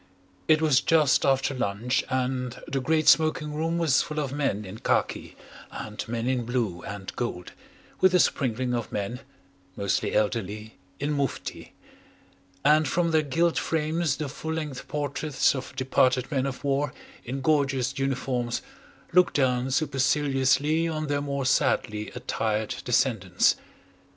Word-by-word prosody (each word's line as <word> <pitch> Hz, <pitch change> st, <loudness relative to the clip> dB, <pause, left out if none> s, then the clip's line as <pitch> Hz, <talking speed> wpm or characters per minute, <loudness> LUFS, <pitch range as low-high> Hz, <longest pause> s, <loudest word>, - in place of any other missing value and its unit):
It 155 Hz, 0 st, +4 dB
was 145 Hz, -3 st, +4 dB
just 155 Hz, -4 st, +3 dB
after 135 Hz, 0 st, +2 dB
lunch 125 Hz, +2 st, -1 dB
and 125 Hz, -1 st, -2 dB
the 135 Hz, -, -1 dB
great 155 Hz, +3 st, +1 dB
smoking 155 Hz, -1 st, +4 dB
room 165 Hz, +2 st, -1 dB
was 160 Hz, -6 st, +3 dB
full 155 Hz, -, -5 dB
of 140 Hz, -3 st, -2 dB
men 135 Hz, -8 st, -1 dB
in 100 Hz, +4 st, -9 dB
khaki -, -, -1 dB, 0.3 s
and 105 Hz, -1 st, -6 dB
men 115 Hz, 0 st, -3 dB
in 125 Hz, -1 st, 0 dB
blue 115 Hz, -7 st, -2 dB
and 100 Hz, -1 st, -7 dB
gold, 105 Hz, -7 st, -4 dB, 0.5 s
with 185 Hz, -1 st, +4 dB
a -, -, +6 dB
sprinkling 125 Hz, -5 st, +1 dB
of 120 Hz, -3 st, -3 dB
men, 105 Hz, +4 st, -3 dB, 0.6 s
mostly 100 Hz, -1 st, -1 dB
elderly, 105 Hz, 0 st, -1 dB, 0.3 s
in 145 Hz, +2 st, -1 dB
mufti; 140 Hz, -2 st, -3 dB, 0.9 s
and 155 Hz, +1 st, +5 dB
from 170 Hz, +4 st, +1 dB
their 160 Hz, -1 st, +4 dB
gilt 165 Hz, +4 st, +1 dB
frames 160 Hz, -1 st, 0 dB
the 155 Hz, -, -3 dB
full 160 Hz, +3 st, -5 dB
length 150 Hz, -5 st, -5 dB
portraits 145 Hz, -1 st, 0 dB
of 130 Hz, -1 st, -6 dB
departed 130 Hz, 0 st, +2 dB
men 135 Hz, -2 st, 0 dB
of 135 Hz, +1 st, -6 dB
war 140 Hz, -1 st, 0 dB, 0.3 s
in 135 Hz, +3 st, -4 dB
gorgeous 135 Hz, -3 st, +1 dB
uniforms 130 Hz, -3 st, -1 dB, 0.5 s
looked 180 Hz, 0 st, +4 dB
down 130 Hz, -2 st, +2 dB
superciliously 140 Hz, +2 st, +2 dB
on 155 Hz, -1 st, -2 dB
their 145 Hz, 0 st, 0 dB
more 140 Hz, -1 st, -2 dB
sadly 105 Hz, -4 st, +1 dB
attired 110 Hz, -3 st, -1 dB
descendants. 110 Hz, -7 st, +2 dB
135 Hz, 140 wpm, -26 LUFS, 125-150 Hz, 0.9 s, a